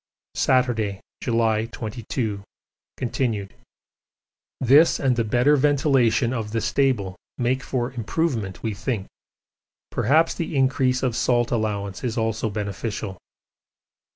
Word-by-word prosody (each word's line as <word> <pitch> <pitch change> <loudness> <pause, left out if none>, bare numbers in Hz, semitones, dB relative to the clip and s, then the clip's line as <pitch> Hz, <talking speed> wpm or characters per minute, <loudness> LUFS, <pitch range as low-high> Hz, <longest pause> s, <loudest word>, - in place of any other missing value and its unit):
Saturday, 115 -6 +1 0.2
July 115 -2 +1
22, 110 -2 -4 0.6
continued. 115 -5 -2 1.1
This 140 +6 +5
and 130 -3 +2
the 120 - +1
better 125 +7 +3
ventilation 135 -4 +3
of 110 -3 -4
the 115 - +1
stable 115 -8 +1 0.2
make 130 +1 0
for 125 -1 -2
improvement 115 - -2
we 110 -2 -1
think 105 -1 -3 0.9
perhaps 155 +8 +3
the 165 -2 -4
increase 130 -1 +2
of 125 -3 0
salt 120 0 +1
allowance 105 -4 -2
is 120 -1 -2
also 110 0 0
beneficial. 105 -1 -4
120 Hz, 110 wpm, -24 LUFS, 110-130 Hz, 1.1 s, This